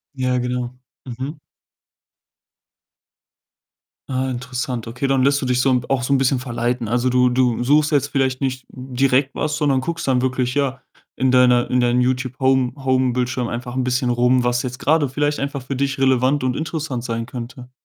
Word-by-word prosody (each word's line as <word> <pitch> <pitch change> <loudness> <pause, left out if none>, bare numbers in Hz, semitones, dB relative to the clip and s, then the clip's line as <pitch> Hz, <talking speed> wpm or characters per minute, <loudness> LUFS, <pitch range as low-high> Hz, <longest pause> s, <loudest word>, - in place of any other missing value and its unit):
Ja, 130 -1 0
genau. 125 0 -3 0.3
Mhm. 130 +5 -6 2.7
Ah, 130 0 -1
interessant. 125 -1 -4
Okay, 130 +4 -3
dann 135 -1 +2
lässt 140 +1 +3
du - - -2
dich 125 0 +1
so 135 - +2
'n 125 -1 +1
auch 135 -2 0
so 140 - +1
'n - - +4
bisschen 135 0 +1
verleiten. 120 -1 -2
Also, 120 +3 +1
du 125 0 +3
du 125 -1 +1
suchst 150 +4 +3
jetzt 145 -2 +2
vielleicht 130 -2 -1
nicht 130 -2 -2
direkt 130 +1 0
was, 150 -1 -1
sondern 145 -3 +2
guckst 165 +4 -4
dann 130 -2 +2
wirklich, 130 -1 -1
ja, 135 -2 -1 0.3
in 130 0 +1
deiner 125 -1 +4
in 125 - +2
deinem 120 0 +2
Youtube-Home 130 0 +1
Home-Bildschirm 125 -1 0
einfach 120 +1 -5
ein 130 - 0
bisschen 125 0 0
rum, 125 +1 +3
was 120 0 0
jetzt 125 0 -5
grade 155 0 +2
vielleicht 145 +3 -1
einfach 140 0 -3
für 130 +2 -5
dich 140 +1 -1
relevant 130 +1 +2
und 130 -1 0
interessant 155 -6 -3
sein 115 -1 -3
könnte. 125 +1 -8
130 Hz, 180 wpm, -20 LUFS, 125-135 Hz, 2.7 s, n